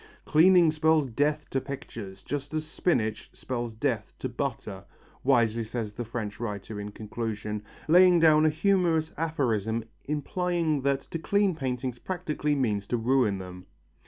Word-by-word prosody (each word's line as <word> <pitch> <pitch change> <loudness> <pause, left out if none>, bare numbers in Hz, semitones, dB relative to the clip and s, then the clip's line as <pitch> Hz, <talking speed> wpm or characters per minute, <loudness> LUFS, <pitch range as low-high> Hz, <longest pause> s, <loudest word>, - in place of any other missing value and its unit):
"Cleaning 170 +1 +6
spells 155 -1 +3
death 145 +5 0
to 135 - 0
pictures, 105 -8 -8
just 145 +1 -4
as 155 0 -1
spinach 135 -9 -1
spells 120 -3 -4
death - - -2
to - - -3
butter," - - -4 0.4
wisely 115 -4 +3
says 110 -1 -4
the 120 - -4
French 110 -3 -5
writer 105 -2 -5
in 105 - -5
conclusion, 105 0 -4 0.3
laying 180 +2 +7
down 155 -1 +6
a - - +5
humorous 165 -1 +2
aphorism 115 -9 -1 0.2
implying 165 0 -1
that 140 0 +1
to 165 - -6
clean 200 +2 +2
paintings 125 -4 -3
practically 155 -5 -2
means 105 -7 0
to 120 - 0
ruin 120 -3 +2
them. 90 -1 -9
135 Hz, 145 wpm, -28 LUFS, 110-160 Hz, 0.4 s, laying